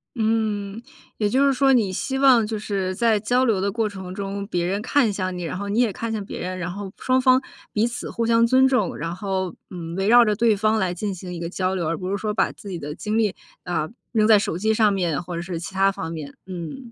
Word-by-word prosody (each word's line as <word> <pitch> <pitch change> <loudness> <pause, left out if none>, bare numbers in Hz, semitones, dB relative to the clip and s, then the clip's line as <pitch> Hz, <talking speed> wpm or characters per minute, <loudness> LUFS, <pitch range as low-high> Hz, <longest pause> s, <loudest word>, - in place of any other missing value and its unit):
嗯， 215 -2 -1 0.4
也 210 -2 +1
就 270 +6 +3
是 275 - +4
说 270 +1 +3
你 215 -7 +3
希 265 +8 -2
望 260 -5 +5
就 215 0 -3
是 195 -3 -2
在 225 -1 +3
交 245 +5 +2
流 210 -5 +2
的 200 0 0
过 220 0 0
程 190 -3 -7
中， 200 +1 -4
别 175 -5 -1
人 195 +3 -1
看 250 -1 +2
向 185 -2 -3
你， 180 - -5
然 170 +2 -4
后 200 0 -4
你 210 +3 +1
也 235 -5 +2
看 230 +3 -4
向 215 -2 -2
别 - - -7
人， 185 +1 -4
然 180 -1 -3
后 200 0 -6
双 255 0 +2
方 255 0 +5 0.3
彼 215 +2 +2
此 240 +1 -4
互 230 - -2
相 230 0 +4
尊 260 +2 +5
重， 250 -8 +1
然 165 +3 -4
后， 190 -2 -3
嗯， 170 -2 -6
围 195 +1 0
绕 240 +1 +7
着 210 -1 +1
对 225 -2 +3
方 215 +1 +2
来 185 -3 0
进 200 +3 -3
行 180 0 -7
一 170 - -6
个 170 - -3
交 185 0 -1
流， 170 -4 -1
而 165 - 0
不 185 0 -4
是 200 - 0
说 210 +1 -2
把 - - +1
自 200 - -11
己 180 -3 -4
的 150 0 -6
精 215 +3 -2
力， 215 -4 +1 0.3
啊， 165 -3 -1 0.2
扔 215 -2 +3
在 215 -2 +7
手 175 -4 -2
机 220 +3 +1
上 215 -1 +4
面 175 -6 0
或 175 0 -6
者 170 - -3
是 175 -1 -5
其 175 - -7
它 195 +1 +4
方 165 -4 -5
面。 150 -4 -7
嗯， 185 - -7
200 Hz, 285 characters per minute, -23 LUFS, 185-225 Hz, 0.4 s, 绕